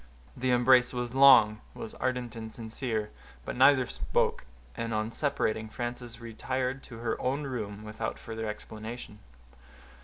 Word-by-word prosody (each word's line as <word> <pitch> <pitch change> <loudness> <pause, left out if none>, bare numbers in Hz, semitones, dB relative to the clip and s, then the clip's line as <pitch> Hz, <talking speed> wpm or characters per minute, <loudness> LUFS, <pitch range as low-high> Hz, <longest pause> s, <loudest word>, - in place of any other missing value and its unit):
The 130 +1 -1
embrace 125 0 +5
was 125 -1 -3
long—was 115 -6 +5
ardent 125 -1 -2
and 110 -1 -6
sincere—but 110 -1 -5
neither 130 0 +6
spoke; 65 - -1 0.3
and 115 -1 -2
on 110 +1 -1
separating, 110 -6 -1
Frances 120 0 -5
retired 130 +3 -3
to 115 - -10
her 115 0 -2
own 135 +4 0
room 105 -6 -4
without 110 +1 -4
further 110 -1 -5
explanation. 110 +1 -7
120 Hz, 125 wpm, -29 LUFS, 110-130 Hz, 0.3 s, neither